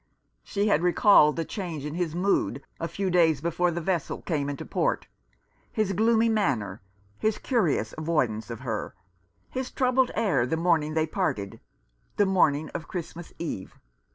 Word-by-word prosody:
She 200 - -1
had 165 -7 +3
recalled 175 -3 +5
the 165 - -2
change 170 -8 -5
in 150 - -4
his 170 -2 -2
mood 180 -6 0 0.2
a 165 - -2
few 190 +3 -2
days 165 -5 +4
before 170 +3 +1
the 170 0 -2
vessel 175 -2 -2
came 145 -4 -1
into 140 - -5
port - - 0 0.3
— - - -45 0.3
his 210 -3 0
gloomy 225 +3 +3
manner; 130 - 0 0.4
his 215 -1 +1
curious 170 - 0
avoidance 140 -9 -1
of 115 0 -6
her; 115 -5 -4 0.6
his 260 0 -3
troubled 255 0 +2
air 140 - +2
the 160 - -1
morning 160 -3 +1
they 160 -1 +2
parted, 155 - -2 0.6
the 205 - +4
morning 155 -6 +2
of 165 - -6
Christmas 175 -1 -6
Eve. 155 - -5
165 Hz, 160 wpm, -27 LUFS, 150-195 Hz, 0.6 s, recalled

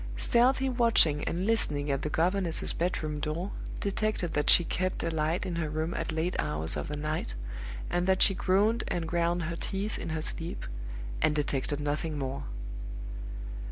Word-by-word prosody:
Stealthy 260 - +3
watching 230 - +4
and 180 +3 -1
listening 150 -10 +2
at 135 0 0
the 150 - -2
governess's 175 +2 +2
bedroom 155 -3 -1
door 160 +6 -2 0.3
detected 200 -3 -1
that 150 0 +1
she 175 - +8
kept 185 +2 -1
a 165 - 0
light 160 +2 0
in 175 -2 -3
her 160 -2 -1
room 160 +3 -2
at 165 - -2
late 160 +3 -1
hours 80 +2 +4
of - - -3
the 150 - -4
night, 150 - -2 0.5
and 175 +1 0
that 190 0 +5
she 195 - +5
groaned 205 +5 +2
and 170 -2 -2
ground 170 +1 +1
her 165 +2 -3
teeth 195 +5 -3
in - - -5
her 160 -1 -2
sleep 165 +1 -4 0.6
and 150 - +3
detected 145 -1 -1
nothing 150 +1 -2
more. 135 -1 -3
165 Hz, 170 wpm, -29 LUFS, 150-185 Hz, 0.6 s, she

